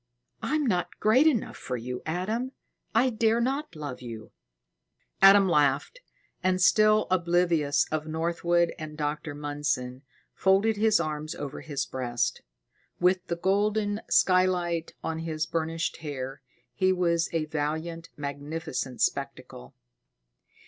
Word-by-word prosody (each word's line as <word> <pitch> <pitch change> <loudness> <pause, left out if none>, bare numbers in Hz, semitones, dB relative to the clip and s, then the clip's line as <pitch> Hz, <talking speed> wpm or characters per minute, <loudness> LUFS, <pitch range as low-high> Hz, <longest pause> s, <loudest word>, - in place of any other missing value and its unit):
"I 305 - -1
am 305 -2 +1
not 180 -7 -1
great 255 +8 +5
enough 255 -9 0
for 125 - -4
you, 125 +2 -5
Adam. 215 +10 -2 0.4
I 250 +3 +4
dare 225 0 +2
not 270 - -2
love 145 -5 -6
you." 115 -3 -8 0.9
Adam 195 0 +8
laughed, 150 - +2 0.4
and 185 0 +1
still 215 +3 +5
oblivious 170 -4 +2
of 155 0 -2
Northwood 170 +1 +1
and 155 -1 -7
Dr. 150 0 -3
Mundson, 145 -4 -3 0.3
folded 195 +3 +3
his 215 -1 +3
arms 155 -1 -3
over 145 -2 -6
his 145 -3 -3
breast. 120 -1 -2 0.6
With 180 +1 +2
the 170 - -1
golden 205 +3 +1
skylight 180 -3 +2
on 160 0 -3
his 160 -1 -2
burnished 165 0 -2
hair, 135 -4 -6 0.3
he 185 -1 +2
was 170 -2 +1
a 165 -2 0
valiant, 160 +2 -3
magnificent 145 -2 -4
spectacle. 65 +1 -3
165 Hz, 125 wpm, -27 LUFS, 150-190 Hz, 0.9 s, Adam